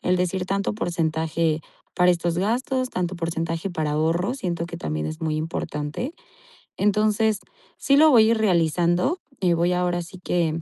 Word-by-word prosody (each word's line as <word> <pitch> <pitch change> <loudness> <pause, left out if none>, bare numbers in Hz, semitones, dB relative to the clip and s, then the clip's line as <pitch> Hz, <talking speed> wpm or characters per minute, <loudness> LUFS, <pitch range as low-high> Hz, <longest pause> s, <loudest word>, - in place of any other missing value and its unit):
el 180 +1 +2
decir 180 +1 -1
tanto 195 +1 -1
porcentaje 160 -4 -1 0.3
para 180 0 +4
estos 170 -1 0
gastos, 255 +6 0
tanto 180 0 -2
porcentaje 165 +1 -2
para 155 -3 -2
ahorro, 165 +9 0
siento 175 -9 -3
que - - -7
también 75 0 -3
es 155 +1 -6
muy 155 -1 -1
importante. 155 - -4 0.6
Entonces 210 +1 +2 0.4
sí 275 - +2
lo 310 +2 +7
voy 225 -4 +6
a - - +4
ir 230 - +2
realizando 175 - +2 0.2
y 180 -2 +3
voy 170 +2 +2
ahora 180 -1 0
sí 175 +2 -11
que 165 -3 0
175 Hz, 165 wpm, -24 LUFS, 165-200 Hz, 0.6 s, lo